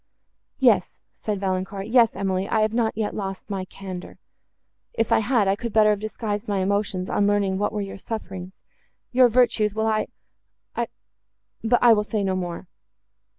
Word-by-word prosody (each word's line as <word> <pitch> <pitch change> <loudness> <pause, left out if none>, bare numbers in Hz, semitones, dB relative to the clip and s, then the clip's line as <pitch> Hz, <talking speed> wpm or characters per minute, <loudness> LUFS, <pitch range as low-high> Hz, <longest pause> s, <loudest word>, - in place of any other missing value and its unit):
—"Yes," - - +3
said 210 -2 -4
Valancourt, 190 +1 -2
"yes, 230 0 +4
Emily: 190 0 -1
I 220 - +2
have 215 0 +1
not 225 -2 0
yet 215 -2 -1
lost 195 0 -5
my 190 -2 -2
candour: 185 -1 -8 0.8
if 225 - -1
I - - +5
had, 220 -2 +2
I 195 - +3
could 235 +2 -5
better 215 -1 +5
have 205 - 0
disguised 215 0 -4
my 205 -1 0
emotions, 190 -1 0
on 200 - +1
learning 200 -2 +1
what 205 - 0
were 210 - -2
your 195 -1 -6
sufferings—your 195 +5 -2
virtues, 220 -3 +2
while 220 0 0
I—I—but 225 +1 -4
I 240 -1 +8
will 210 -1 +2
say 210 -1 -2
no 190 -1 0
more. 175 -1 -4
205 Hz, 160 wpm, -24 LUFS, 195-220 Hz, 0.8 s, I